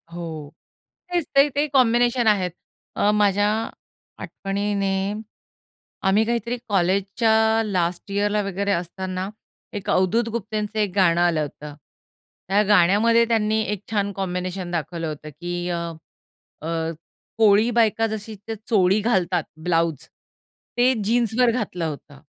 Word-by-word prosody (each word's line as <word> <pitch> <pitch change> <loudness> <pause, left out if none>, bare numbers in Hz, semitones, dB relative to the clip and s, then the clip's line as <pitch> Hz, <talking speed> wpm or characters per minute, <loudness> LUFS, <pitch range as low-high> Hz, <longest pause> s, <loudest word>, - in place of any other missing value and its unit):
हो. 160 -4 -6 0.6
तेच 345 -3 +1
ते. 275 +1 +6
ते 290 +2 0
कॉम्बिनेशन 240 -1 +3
आहेत. 190 -4 +2 0.4
अ, 205 - +3
माझ्या 205 -1 +3 0.7
आठवणीने, 200 0 -2 1.1
आम्ही 200 +3 +4
काहीतरी 235 +1 -1
कॉलेजच्या 195 +4 +2 0.3
लास्ट 180 -2 -2
ईअरला 205 +1 +1
वगैरे 200 +1 -2
असताना, 185 +1 -3 0.4
एक 205 -3 -5
अवधूत 220 +6 +2
गुप्तेंचं 215 -1 -3
एक 205 -3 +1
गाणं 175 -3 +4
आलं 170 -3 +2
होतं. 150 0 -7 0.7
त्या 195 +3 +3
गाण्यामध्ये 210 +4 +4
त्यांनी 220 -1 +1
एक 210 -2 -3
छान 200 -2 0
कॉम्बिनेशन 185 -1 -4
दाखवलं 165 0 -3
होतं 155 0 -7
की 175 +4 -5
अ, 175 - -1 0.8
अ, 165 +1 -2 0.5
कोळी 215 +1 +5
बायका 225 -1 +3
जशी 220 0 -6
ते 225 - -3
चोळी 195 -2 +4
घालतात, 185 -6 +1 0.2
ब्लाउज, 165 -3 0 0.7
ते 250 +2 +4
जीन्सवर 235 +2 +2
घातलं 205 -8 -3
होतं. 145 -2 -7
200 Hz, 120 wpm, -23 LUFS, 175-220 Hz, 1.1 s, ते